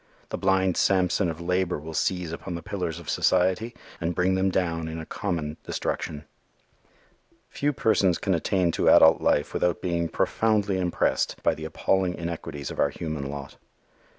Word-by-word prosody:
The - - -3
blind 95 -1 +2
Samson 95 -1 +2
of 80 0 -5
labor 90 +1 0
will 80 +2 -8
seize 90 +1 -1
upon 85 +2 -5
the 85 - -6
pillars 85 -4 -3
of 85 - -11
society 95 +6 +1 0.2
and 85 0 -2
bring 90 +2 +2
them 95 +1 +2
down 85 -3 -1
in 80 0 -5
a 80 - -6
common 80 -7 -3
destruction. 75 0 -3 1.2
Few 145 +1 0
persons 100 -8 +2
can 95 - 0
attain 90 +1 +1
to - - +2
adult - - +7
life 75 - +1
without 90 0 +1
being 85 -2 -1
profoundly 105 -2 +1
impressed 90 -1 0
by - - +3
the 80 - -7
appalling 90 +3 0
inequalities 80 -4 -5
of - - -8
our 70 - +3
human 75 -3 -5
lot. 70 -1 -7
90 Hz, 165 wpm, -26 LUFS, 80-95 Hz, 1.2 s, adult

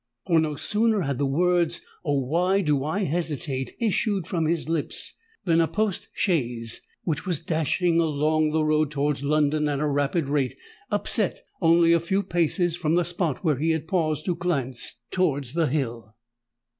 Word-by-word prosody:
For, 170 -3 +4
no 155 -2 0
sooner 215 +6 +1
had 140 -5 -2
the 140 - +1
words—"Oh! 170 -1 0
why 180 +9 +2
do 150 -6 +1
I 185 +8 -1
hesitate?" 150 -6 -2
issued 210 -4 0
from 170 -3 -1
his 165 -2 -1
lips, 160 -2 -2 0.3
than 165 -2 +4
a 165 - +2
post 210 +3 -1
chaise, 120 - -1 0.2
which 160 +2 -2
was 175 -5 0
dashing 165 +2 +1
along 155 0 +2
the 155 0 +1
road 155 -1 +2
towards 145 -1 -1
London 150 +1 +2
at 140 -1 -1
a 150 - 0
rapid 145 +2 0
rate, 140 -2 0 0.3
upset - - 0 0.2
only 170 0 +5
a 170 - +4
few 190 +4 0
paces 175 -1 +1
from 165 -2 0
the 175 -1 +2
spot 170 -4 -2
where 155 -6 +2
he 160 +4 0
had 160 -1 0
paused 155 -5 0
to 180 - +1
glance 135 -9 -2
towards 145 -8 0
the 165 -1 +2
hill. 115 -6 -3
160 Hz, 170 wpm, -25 LUFS, 145-175 Hz, 0.3 s, only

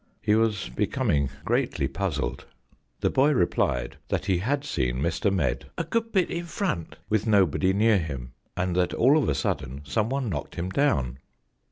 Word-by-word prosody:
He 105 0 +1
was 110 -3 +2
becoming 70 +3 0 0.2
gre&tly - - +1
puzzled. 65 +2 -3 0.5
The - - +2
boy 140 +3 +4
replied 65 - 0
that - - -1
he 95 -3 +2
had 140 +8 -1
seen 65 - -1
Mr. 85 +8 0
Medd 80 -6 0
"a - - 0
good 230 0 -1
bit 190 -4 +2
in 170 0 -3
front," 165 - -3
with 110 +1 0
nobody 95 -3 +3
near 105 +1 +4
him, 70 -7 -5 0.3
and 90 -1 0
that 90 -1 +1
all 130 +5 +5
of 155 - +2
a 70 - +1
sudden 70 0 -2
someone 115 - 0
knocked 75 -9 -4
him 90 +2 -3
down. 65 - +1
95 Hz, 170 wpm, -26 LUFS, -, 0.5 s, all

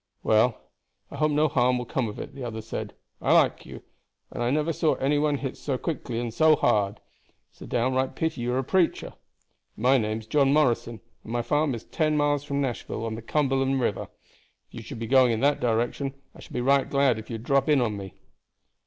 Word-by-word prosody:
"Well, 110 +1 +3 0.5
I - - -7
hope 155 0 +2
no 150 +1 +3
harm 125 -3 +2
will 125 - -4
come 125 0 -1
of 105 - -9
it," - - -7
the 135 -1 -8
other 110 -2 -5
said. 115 - -6 0.3
"I - - +3
like - - +3
you, - - -10 0.5
and - - -5
I 120 - +1
never 155 +4 0
saw 155 0 +1
any 145 +2 +1
one 145 -1 +1
hit 135 -2 -5
so 135 -3 -2
quickly 125 -6 -4
and 120 -2 -4
so 155 +4 +5
hard. 105 -7 +1 0.5
It's - - -28
a - - -8
downright 130 +2 0
pity 160 -5 -2
you 120 +1 -1
are - - 0
a 135 - 0
preacher. 180 +5 0 0.6
My 130 +4 +4
name's 110 0 -3
John 135 +3 +2
Morrison, 120 -6 +1 0.2
and 110 - -9
my 120 0 -1
farm 145 -1 +1
is 115 - -8
ten 155 -2 0
miles 145 -1 +1
from 140 -1 -2
Nashville, 120 -3 -3
on 115 - -3
the 110 - -6
Cumberland 135 +1 0
River. 115 -5 -1 0.6
If - - -31
you - - -7
should - - -8
be 115 - -4
going 130 0 +4
in 110 - -1
that 145 +1 +3
direction 120 +4 -1 0.2
I - - -16
should - - -13
be 125 - -1
right 140 +2 +2
glad 140 -5 +2
if 110 - -11
you 115 - -4
would 110 - -7
drop 140 +3 +1
in 150 -2 +5
on 115 -4 0
me." 95 -4 -8
130 Hz, 225 wpm, -26 LUFS, 115-145 Hz, 0.6 s, so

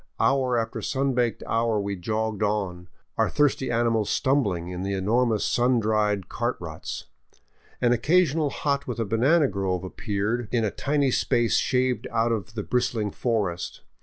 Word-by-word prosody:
Hour 130 -2 +2
after 115 -1 -2
sun 135 0 0
baked 120 -2 0
hour 115 -1 +1
we 100 0 -2
jogged 110 +3 -2
on, 100 -4 -1 0.3
our - - +3
thirsty 145 -3 +1
animals 115 -3 +1
stumbling 105 -11 +1
in 90 0 -5
the 100 +1 -2
enormous 110 +3 +1
sun 125 0 +2
dried 105 -3 +1
cart - - -2
ruts. - - -6 0.8
An 120 -1 +4
occasional 155 +3 +2
hut 140 0 -1
with 125 - -3
a 115 - -1
banana 135 +9 +3
grove 95 -4 -2
appeared 105 +4 -2
in 115 -3 +1
a 105 - -1
tiny 140 -2 0
space 120 -1 +2
shaved 125 -3 +1
out 115 +1 +1
of 110 0 -3
the 105 - -3
bristling 115 -3 0
forest. 100 -8 -2
115 Hz, 160 wpm, -25 LUFS, 105-125 Hz, 0.8 s, An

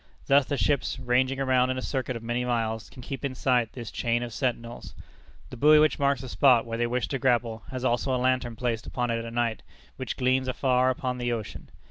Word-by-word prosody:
Thus 140 0 +4
the 145 - -2
ships, 140 -1 0
ranging 130 +1 +1
around 130 -1 +2
in 130 - -1
a - - -3
circuit 130 -2 -2
of 115 - -7
many 120 +1 -1
miles, 115 -3 -2
can 125 - -12
keep 135 +2 -6
in 135 -2 -3
sight 125 -3 +1
this 120 -4 -7
chain 120 0 -1
of 120 -2 -6
sentinels. 120 -2 -4 0.6
The 125 - -8
buoy 150 +5 +6
which 155 0 +3
marks 140 -3 +1
the 130 - -7
spot 125 -1 +4
where 115 0 -4
they 120 - +1
wish 125 +1 -1
to 135 - -2
grapple 115 -2 +1
has 130 -1 -4
also 130 +2 +1
a - - +1
lantern 125 -2 0
placed 115 -1 -2
upon 120 -2 -2
it 115 0 -2
at 115 - -7
night, 115 -2 -1 0.4
which 130 -3 -5
gleams 130 0 +1
afar 130 0 +2
upon 125 0 -2
the 120 0 -1
ocean. 110 -4 -5
125 Hz, 225 wpm, -27 LUFS, 120-130 Hz, 0.6 s, buoy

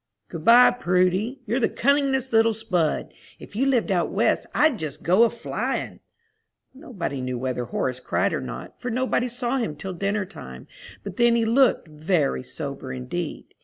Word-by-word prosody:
"Good 160 - -7
by, 240 +5 +8
Prudy. 190 +4 0
You're 235 +5 0
the 235 - +2
cunningest 270 -1 +1
little 225 0 +4
spud! 185 -8 -1 0.2
If - - -13
you 265 +5 +1
lived 240 -6 +1
out 175 -2 +1
West - - +1
I'd 295 -7 +2
just 155 -4 -5
go 185 +7 +5
a - - +2
flyin'." 235 0 -4 0.7
Nobody 210 - -5
knew 125 -1 -3
whether 125 -1 -3
Horace 125 +2 -2
cried - - 0
or - - -2
not, - - -8
for 250 - -3
nobody 250 +1 0
saw 245 +1 -2
him 225 - -2
till 185 +5 -6
dinner 200 +3 -1
time, 65 - -11 0.4
but 200 -2 -7
then 235 -1 +4
he 230 -1 +2
looked 245 -5 +3
very 155 -2 0
sober 140 0 -6
indeed. 130 +6 -5
200 Hz, 170 wpm, -24 LUFS, 155-245 Hz, 0.7 s, by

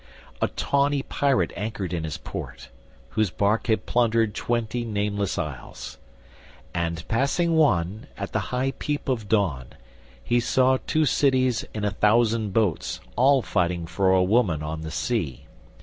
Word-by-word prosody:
A - - +3
tawny 140 0 0
pirate 140 -2 +1
anchored 100 -4 -4
in 80 -2 -2
his 80 - -4
port, - - -8 0.4
Whose 110 -3 +1
bark 105 +6 0
had 110 -2 +1
plundered 115 -3 +2
twenty 120 +1 -1
nameless 100 -3 -1
isles; 75 -8 -6 0.7
And 85 -1 -2
passing 150 +8 +1
one, 105 - +2
at - - -5
the - - 0
high 130 +2 0
peep 145 -1 -3
of 115 -6 -2
dawn, 85 - +1 0.6
He 120 - +2
saw 130 +2 +3
two 155 0 +2
cities 130 -3 +2
in 105 -1 -3
a 105 - +1
thousand 110 +1 +2
boats 100 -5 0 0.2
All 135 0 +4
fighting 85 -1 0
for 95 +3 +1
a 95 -1 +4
woman 90 -6 +2
on 80 +1 -4
the 80 - -5
sea. 80 - -2
110 Hz, 150 wpm, -25 LUFS, 90-125 Hz, 0.7 s, All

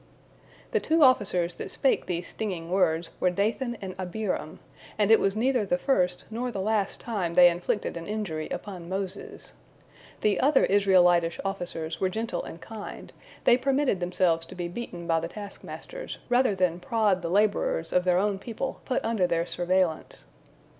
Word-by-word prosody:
The - - +2
two 320 0 +3
officers 185 -9 +3
that - - -5
spake 270 - +1
these 175 0 -3
stinging 180 -6 -4
words 170 -3 +1
were 180 - +3
Dathan 225 +6 -1
and 190 -1 -5
Abiram, 190 +2 -3 0.4
and 210 0 +3
it 225 - +8
was 195 +1 +1
neither 250 +1 +2
the 185 -3 0
first 180 -5 0
nor 245 +3 -2
the 210 -5 -5
last 205 0 0
time 190 -8 -3
they 175 -1 +8
inflicted 175 +4 -2
an 170 0 -6
injury 200 -8 -3
upon 180 -1 -6
Moses. 190 +1 -6 0.7
The 210 -3 +2
other 275 +1 +4
Israelitish 180 -4 +4
officers 175 -4 -4
were 190 - +2
gentle 220 -2 -3
and 165 - -9
kind; 220 +3 -9 0.3
they 240 - +6
permitted 270 -5 +1
themselves 175 -2 +1
to - - -10
be 175 -1 -3
beaten 175 -3 -7
by 165 -1 +2
the 165 - -4
taskmasters 210 - -8
rather 245 -4 +3
than 180 -2 +1
prod 205 -2 +1
the 170 - -3
laborers 200 -4 +1
of 180 - +3
their 180 -1 +3
own 200 0 +1
people 240 +5 -5
put 255 - -1
under 220 -5 +1
their 170 -1 0
surveillance. 175 -2 -1
190 Hz, 165 wpm, -27 LUFS, 175-220 Hz, 0.7 s, it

